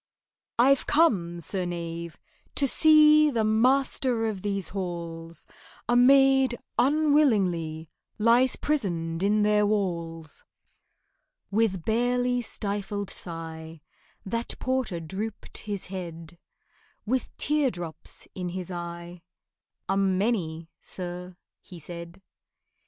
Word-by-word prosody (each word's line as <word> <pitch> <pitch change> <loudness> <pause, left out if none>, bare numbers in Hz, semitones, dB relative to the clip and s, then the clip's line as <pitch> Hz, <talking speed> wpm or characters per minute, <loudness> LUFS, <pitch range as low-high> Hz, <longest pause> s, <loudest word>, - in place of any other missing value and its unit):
"I've 265 +3 +4
come, 185 - +2
Sir 185 +3 -1
Knave, 170 -1 -5 0.4
to 280 - +3
see 305 +1 +6
The 230 -5 0
master 245 +1 +2
of 210 -4 -3
these 200 -3 -2
halls: 170 -3 -5 0.4
A 240 - +2
maid 265 0 +5 0.2
unwillingly 220 - +2 0.3
Lies 235 +4 +4
prisoned 170 - -2
in 210 +2 +2
their 210 0 +3
walls."' 170 -6 -2 1.1
With 200 -5 +1
barely 245 +2 +1
stifled 205 -2 -4
sigh 165 -1 -6 0.5
That 230 +4 -3
porter 255 -9 -1
drooped 195 +7 -6
his 205 -3 -5
head, 170 -3 -8 0.7
With 255 +4 -2
teardrops 190 - -2
in 180 -1 -4
his 185 0 -5
eye, 170 0 -7 0.7
"A 195 - +1
many, 190 -4 0
sir," 180 0 -7 0.2
he 180 - -12
said. 170 +3 -9
195 Hz, 100 wpm, -27 LUFS, 170-245 Hz, 1.1 s, see